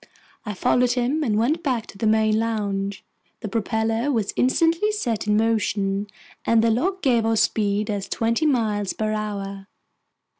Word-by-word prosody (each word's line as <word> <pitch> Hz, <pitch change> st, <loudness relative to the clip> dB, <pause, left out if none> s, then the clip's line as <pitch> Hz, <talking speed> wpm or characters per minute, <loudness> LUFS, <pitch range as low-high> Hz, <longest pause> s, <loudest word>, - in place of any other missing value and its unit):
I 210 Hz, -, -3 dB
followed 245 Hz, +5 st, +2 dB
him 260 Hz, +5 st, 0 dB
and 215 Hz, -6 st, +1 dB
went 285 Hz, +9 st, +1 dB
back 250 Hz, -7 st, -1 dB
to -, -, -13 dB
the 220 Hz, -, +1 dB
main 220 Hz, 0 st, +3 dB
lounge. 200 Hz, -3 st, -2 dB, 0.4 s
The 220 Hz, -, -4 dB
propeller 225 Hz, +4 st, -1 dB
was 220 Hz, -6 st, -1 dB
instantly 330 Hz, +10 st, +2 dB
set 235 Hz, -, -2 dB
in 210 Hz, 0 st, +3 dB
motion, 210 Hz, -3 st, 0 dB, 0.4 s
and 230 Hz, -1 st, +3 dB
the 230 Hz, -, +3 dB
log 370 Hz, -, -1 dB
gave 240 Hz, -5 st, +3 dB
our 225 Hz, 0 st, +1 dB
speed 210 Hz, -1 st, +1 dB
as 200 Hz, -2 st, -4 dB
twenty 230 Hz, +7 st, +1 dB
miles 215 Hz, -7 st, 0 dB
per 215 Hz, 0 st, -2 dB
hour. 200 Hz, -2 st, -4 dB
220 Hz, 160 wpm, -23 LUFS, 210-245 Hz, 0.4 s, main